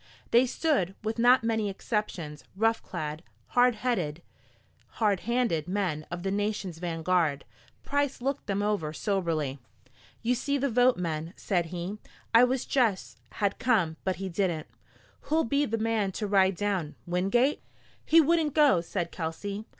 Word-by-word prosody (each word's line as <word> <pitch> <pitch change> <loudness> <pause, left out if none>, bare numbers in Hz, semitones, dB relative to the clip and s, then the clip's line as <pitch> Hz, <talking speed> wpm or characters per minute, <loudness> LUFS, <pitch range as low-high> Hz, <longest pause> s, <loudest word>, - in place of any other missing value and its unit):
They 245 +2 +5
stood, 240 - 0
with 220 +1 -2
not 245 +1 +5
many 220 -2 0
exceptions 190 -7 -3
rough 225 +3 +2
clad, 155 +1 -5 0.3
hard 245 -1 +4
headed, 180 -10 -2 0.7
hard 205 -4 +2
handed 235 -10 0
men 180 -6 -2
of 175 0 -5
the 195 - -1
nation's 205 -4 -2
vanguard. 165 -3 0 0.4
Price 285 -1 0
looked 270 +2 -3
them 200 0 0
over 200 -8 -1
soberly. 160 -8 -1 0.6
"You 240 +2 +2
see 280 +3 -1
the 280 -1 0
vote, 245 +2 +4
men," 165 0 -3
said 175 -4 0
he. 180 +4 -5 0.3
"I 230 +2 +8
wish 255 0 -1
Jess 230 -8 0 0.2
had 200 -2 -1
come, 190 -10 +2
but 190 -1 0
he 190 +3 -5
didn't. 175 -4 -1 0.6
Who'll 320 +1 +2
be 280 +4 +1
the 225 - -1
man 220 -3 0
to 215 - -3
ride 195 -2 +3
down? 190 -6 -2
Wingate?" 195 +11 +1 0.4
"He 330 - +5
wouldn't 320 -1 +2
go," 290 - +5
said 170 0 -3
Kelsey. 200 +6 -5
200 Hz, 150 wpm, -28 LUFS, 175-240 Hz, 0.7 s, I